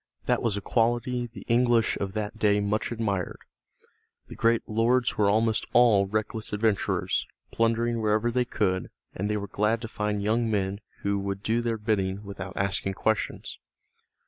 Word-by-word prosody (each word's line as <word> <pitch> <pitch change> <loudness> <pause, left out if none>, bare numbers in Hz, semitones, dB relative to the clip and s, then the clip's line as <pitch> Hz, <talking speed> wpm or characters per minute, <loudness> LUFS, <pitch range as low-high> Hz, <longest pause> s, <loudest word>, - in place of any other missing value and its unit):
That - - +1
was 110 -4 0
a - - -3
quality 120 +2 0
the 110 -4 -12
English 120 -1 +3
of 100 -1 -3
that 110 +1 -4
day 105 -1 +3
much 105 +3 -1
admired. 105 -6 -2 0.9
The - - -8
great 115 0 +2
lords 120 +3 +2
were 105 -1 +3
almost 110 +1 +1
all 110 -5 +5
reckless 110 +1 -3
adventurers, 105 -1 0 0.2
plundering 115 0 +1
wherever 110 +2 +2
they 125 +1 +1
could, 95 -6 -1 0.2
and 105 +3 -2
they 105 - 0
were 100 0 -4
glad 105 +4 +1
to 115 - -4
find 105 -2 -2
young 115 +2 +1
men 100 -1 -1 0.2
who 100 0 +1
would 100 0 -4
do 115 +2 +1
their 115 -1 -1
bidding 105 -2 -1
without 95 -2 -7
asking 95 0 -1
questions. 110 +1 -2
110 Hz, 165 wpm, -27 LUFS, 100-115 Hz, 0.9 s, all